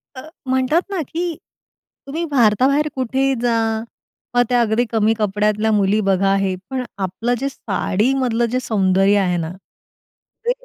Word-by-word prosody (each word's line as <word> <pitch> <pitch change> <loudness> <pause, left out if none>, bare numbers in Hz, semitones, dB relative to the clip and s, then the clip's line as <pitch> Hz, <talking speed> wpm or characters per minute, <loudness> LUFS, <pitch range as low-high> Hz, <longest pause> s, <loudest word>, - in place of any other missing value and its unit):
अ, 260 - -7 0.2
म्हणतात 260 +5 +2
ना, 385 -4 -2
की 340 0 -3 0.7
तुम्ही 320 +5 -3
भारताबाहेर 265 +4 +3
कुठेही 265 +1 0
जा. 240 -1 +1 0.8
मग 245 - +5
त्या 245 -1 +3
अगदी 230 +2 +1
कमी 220 -1 +2
कपड्यातल्या 210 +1 +1
मुली 205 0 +2
बघा 195 0 +2
हे, 195 -1 0
पण 260 -1 -2
आपलं 200 +6 -2
जे 275 +2 -1
साडीमधलं 235 +3 0
जे 255 - +1
सौंदर्य 195 -3 +2
आहे 180 -2 +1
ना, 165 -1 -3 0.9
ते 480 - +3
230 Hz, 140 wpm, -19 LUFS, 200-265 Hz, 0.9 s, मग